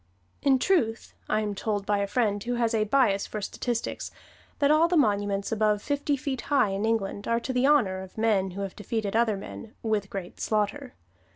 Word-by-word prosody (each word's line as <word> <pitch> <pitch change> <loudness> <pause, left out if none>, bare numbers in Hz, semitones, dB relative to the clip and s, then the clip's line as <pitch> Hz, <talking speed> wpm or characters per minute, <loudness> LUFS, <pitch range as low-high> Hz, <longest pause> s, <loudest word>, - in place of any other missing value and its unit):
In 275 -2 +4
truth, 250 -8 0 0.2
I 215 - +2
am 210 -1 -2
told 205 0 -2
by 205 0 +1
a 200 - 0
friend 205 -3 0
who 245 +1 -2
has 235 -1 +1
a 215 -1 +2
bias 215 -4 +2
for 215 - -5
statistics, 235 +3 -3 0.5
that 285 0 +3
all 320 +2 +5
monuments 205 - +1
above 210 -1 +1
fifty 285 0 0
feet 265 -1 -3
high 280 -8 +4
in 195 +2 -1
England 205 -2 -1
are 230 0 +2
to 260 - -3
the 250 +2 +3
honor 210 -11 +3
of 190 +2 -11
men 210 -4 +2
who - - -3
have 195 -1 -5
defeated 215 -1 -3
other 225 -3 +2
men 215 +2 -9
"with 215 -3 0
great 190 -3 -7
slaughter." 215 +5 -1
220 Hz, 195 wpm, -27 LUFS, 200-250 Hz, 0.5 s, all